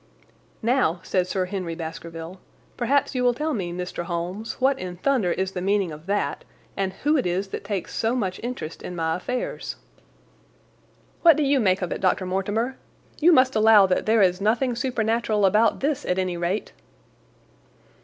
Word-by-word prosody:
"Now," 230 -8 +2
said 185 -1 0
Sir 185 0 -1
Henry 180 -3 -4
Baskerville, 165 +1 -7 0.4
"perhaps 270 +3 +1
you 250 -1 0
will 245 -1 +3
tell 305 +3 -1
me, 185 -6 -3
Mr. 180 0 -5
Holmes, 180 +6 -4
what 270 +1 +1
in 180 -1 -6
thunder 240 -5 +1
is 190 +1 -1
the 180 - -4
meaning 195 -2 +1
of 155 +3 -11
that, 205 +1 -1 0.3
and 190 -1 -1
who 300 +2 +3
it 255 - 0
is 190 +3 -1
that - - -5
takes 200 -3 -4
so 230 +2 0
much 190 -7 -2
interest 235 -10 -5
in 180 - -6
my 160 -1 0
affairs?" 250 +7 -4 1.5
"What 330 -3 +7
do 305 - +2
you 275 -1 +3
make 190 -4 +2
of 180 - -3
it, - - -3
Dr. 185 0 +1
Mortimer? 205 +7 -1 0.4
You 335 +3 +6
must 255 -5 +4
allow 215 -2 +7
that 185 +2 0
there 220 -1 +5
is 180 0 +2
nothing 235 +4 +1
supernatural 225 -4 0
about 215 +3 +3
this, 290 0 0
at 180 - -1
any 185 -2 -1
rate?" 175 +4 -2
200 Hz, 175 wpm, -24 LUFS, 180-245 Hz, 1.5 s, What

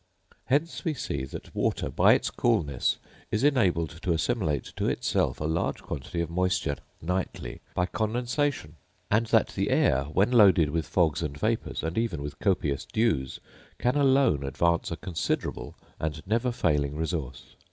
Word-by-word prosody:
Hence 150 +5 0
we 160 -3 -1
see 70 - -3
that 65 - -9
water, - - 0
by - - +5
its - - 0
coolness, 70 -5 +1 0.3
is 110 +4 0
enabled 90 - +2
to 90 - +1
assimilate 80 - -1
to - - 0
itself - - 0
a - - -3
large 80 +1 -1
quantity 75 +5 -4
of 85 - -3
moisture 90 -4 0 0.3
nightly 90 -8 -3
by 90 - +2
condensation; 120 - -1 0.3
and 115 +2 +3
that - - +3
the - - -1
air, 70 +1 +3
when 95 +10 +1
loaded 95 -10 +6
with 80 0 -1
fogs 85 -4 +2
and 75 -3 -3
vapours, 110 -1 -1
and 80 +6 -1
even 115 -11 -2
with 70 0 -7
copious 80 -8 0
dews, 105 - 0 0.4
can 125 +2 +1
alone 135 - +3
advance 85 +5 +1
a 85 - -4
considerable 90 -3 -3 0.2
and 80 0 -4
never 115 +5 +1
failing 75 - 0
resource. 75 -6 -4
85 Hz, 155 wpm, -27 LUFS, 75-115 Hz, 0.4 s, loaded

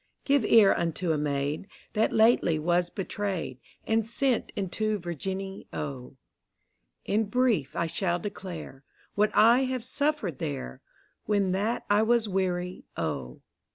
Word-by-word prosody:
Give 280 -3 +3
ear 210 -2 +6
unto 170 0 -1
a 155 - +1
Maid 145 +3 -2 0.3
That 215 - +2
lately 220 -7 +4
was 175 +3 +1
betray'd, 195 -8 -3 0.3
And 225 0 +2
sent 240 +3 0
into 210 +2 -1
Virginny, 190 +3 -5
O: 140 -3 -6 0.9
In 215 +2 +1
brief 225 - +1
I 170 - 0
shall 175 +2 0
declare, 175 -7 -7 0.3
What 210 +1 +3
I 235 +5 +6
have 255 -2 -2
suffered 260 - -1
there. 140 - -5 0.4
When 200 -3 +1
that 205 +5 -1
I 205 +1 +4
was 230 0 +2
wear>', 180 -2 -1 0.2
O. 70 -6 -4
195 Hz, 130 wpm, -28 LUFS, 165-220 Hz, 0.9 s, ear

